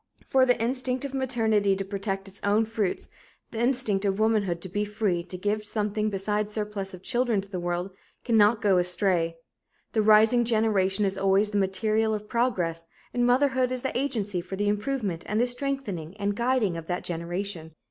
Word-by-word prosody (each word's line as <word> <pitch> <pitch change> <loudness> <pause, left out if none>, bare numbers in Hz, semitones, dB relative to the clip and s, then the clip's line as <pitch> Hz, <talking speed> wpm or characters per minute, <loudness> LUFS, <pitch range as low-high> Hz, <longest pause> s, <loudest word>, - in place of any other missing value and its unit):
For 260 -1 +4
the 245 -1 +3
instinct 255 +2 -1
of 275 - -6
maternity 220 -7 +1
to 195 0 -4
protect 195 0 -4
its 195 +1 -9
own 210 +2 +3
fruits, 220 -4 -2 0.4
the 225 - -5
instinct 235 -5 +2
of 195 -1 0
womanhood 210 -6 +1
to 185 - -7
be 205 +3 -2
free 210 -4 -1
to 185 - -7
give 210 +3 -1
something 210 0 -1
besides 210 +1 -2
surplus 210 -3 -4
of 180 - -15
children 240 -4 +1
to 195 - -6
the 190 -2 -5
world, 175 +2 -2 0.3
cannot 220 -1 +3
go 195 -3 +4
astray. 175 -2 +1 0.6
The 220 - +3
rising 220 +3 +5
generation 215 -3 +2
is 195 0 -2
always 195 +2 +3
the 205 - +1
material 215 +3 +1
of 210 0 -7
progress, 185 -10 0 0.3
and 245 0 +2
motherhood 260 0 +2
is 255 -1 -3
the 265 - -3
agency 215 -9 -1
for 180 +2 -6
the 205 +1 0
improvement 210 -4 -2
and 210 +1 0
the 240 - +4
strengthening 245 - -4
and 200 0 -1
guiding 235 -7 +1
of 165 -1 -8
that 180 0 -2
generation. 170 -1 -4
210 Hz, 185 wpm, -26 LUFS, 195-235 Hz, 0.6 s, rising